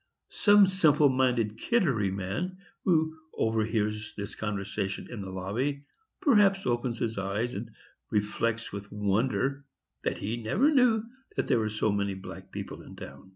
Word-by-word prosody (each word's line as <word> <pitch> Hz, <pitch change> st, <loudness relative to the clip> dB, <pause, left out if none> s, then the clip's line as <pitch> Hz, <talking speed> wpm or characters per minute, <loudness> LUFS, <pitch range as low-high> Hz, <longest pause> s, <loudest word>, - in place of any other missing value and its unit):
Some 205 Hz, -1 st, +6 dB
simple 155 Hz, -6 st, +4 dB
minded 125 Hz, -5 st, +1 dB
Kittery 140 Hz, -, +2 dB
man, 100 Hz, -, -3 dB, 0.3 s
who 160 Hz, -3 st, +3 dB, 0.2 s
overhears 110 Hz, -1 st, 0 dB
this 100 Hz, -2 st, -5 dB
conversation 100 Hz, -2 st, -3 dB
in 115 Hz, -4 st, -5 dB
the 95 Hz, -, -6 dB
lobby, 115 Hz, +10 st, -2 dB, 0.4 s
perhaps 205 Hz, -7 st, +4 dB
opens 120 Hz, -1 st, 0 dB
his 115 Hz, -3 st, -2 dB
eyes, 105 Hz, +5 st, -1 dB
and 110 Hz, +3 st, -5 dB, 0.4 s
reflects 115 Hz, +2 st, -1 dB
with 100 Hz, 0 st, -7 dB
wonder 110 Hz, +6 st, 0 dB, 0.4 s
that -, -, -1 dB
he 110 Hz, +4 st, -3 dB
never 255 Hz, -, +3 dB
knew 245 Hz, -5 st, +4 dB, 0.3 s
that -, -, 0 dB
there 120 Hz, -, +3 dB
were 110 Hz, -1 st, 0 dB
so 110 Hz, 0 st, 0 dB
many 100 Hz, -1 st, 0 dB
black 95 Hz, -, -10 dB
people -, -, -6 dB
in -, -, -12 dB
the -, -, -7 dB
town. 70 Hz, +7 st, -13 dB
115 Hz, 155 wpm, -29 LUFS, 100-145 Hz, 0.4 s, Some